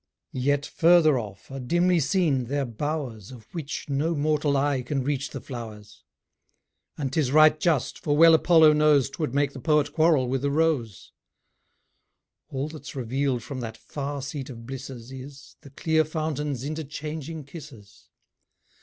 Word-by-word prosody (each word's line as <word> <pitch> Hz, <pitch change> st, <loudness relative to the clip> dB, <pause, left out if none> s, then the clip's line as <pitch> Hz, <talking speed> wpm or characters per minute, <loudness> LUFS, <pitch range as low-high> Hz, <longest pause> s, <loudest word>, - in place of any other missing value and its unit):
Yet 145 Hz, +3 st, 0 dB
further 165 Hz, -5 st, +4 dB
off, 100 Hz, +1 st, -9 dB
are 135 Hz, -, -5 dB
dimly 175 Hz, +7 st, +2 dB
seen 150 Hz, -4 st, +1 dB
their 140 Hz, +3 st, -1 dB
bowers, 120 Hz, -3 st, -4 dB
Of 120 Hz, -4 st, -12 dB
which, 150 Hz, -4 st, -5 dB
no 150 Hz, +4 st, 0 dB
mortal 150 Hz, -1 st, +1 dB
eye 140 Hz, -1 st, +1 dB
can 135 Hz, +2 st, -2 dB
reach 140 Hz, 0 st, -2 dB
the 135 Hz, -, -6 dB
flowers; 110 Hz, -4 st, -9 dB, 0.9 s
And 135 Hz, -3 st, -3 dB
'tis 140 Hz, -5 st, +1 dB
right 155 Hz, +1 st, +6 dB
just, 155 Hz, -6 st, 0 dB
for 145 Hz, -1 st, 0 dB
well 165 Hz, +1 st, +8 dB
Apollo 160 Hz, -1 st, +6 dB
knows 150 Hz, -3 st, +3 dB
'Twould 145 Hz, -4 st, -3 dB
make 140 Hz, -1 st, +1 dB
the 135 Hz, -, -8 dB
Poet 150 Hz, +2 st, +1 dB
quarrel 155 Hz, -5 st, +3 dB
with 130 Hz, +1 st, -1 dB
the 140 Hz, -, 0 dB
rose. 140 Hz, -, -1 dB, 1.4 s
All 135 Hz, +2 st, -3 dB
that's 155 Hz, -2 st, -9 dB
reveal'd 130 Hz, 0 st, -1 dB
from 135 Hz, +1 st, -6 dB
that 115 Hz, -2 st, -6 dB
far 140 Hz, +4 st, -5 dB
seat 140 Hz, -1 st, -6 dB
of 115 Hz, -3 st, -9 dB
blisses, 130 Hz, -1 st, -8 dB
Is, 135 Hz, +1 st, -11 dB
the 140 Hz, -, -13 dB
clear 160 Hz, +3 st, +1 dB
fountains' 150 Hz, -4 st, -3 dB
interchanging 155 Hz, +1 st, -5 dB
kisses. 135 Hz, -, -13 dB
140 Hz, 155 wpm, -25 LUFS, 130-155 Hz, 1.4 s, well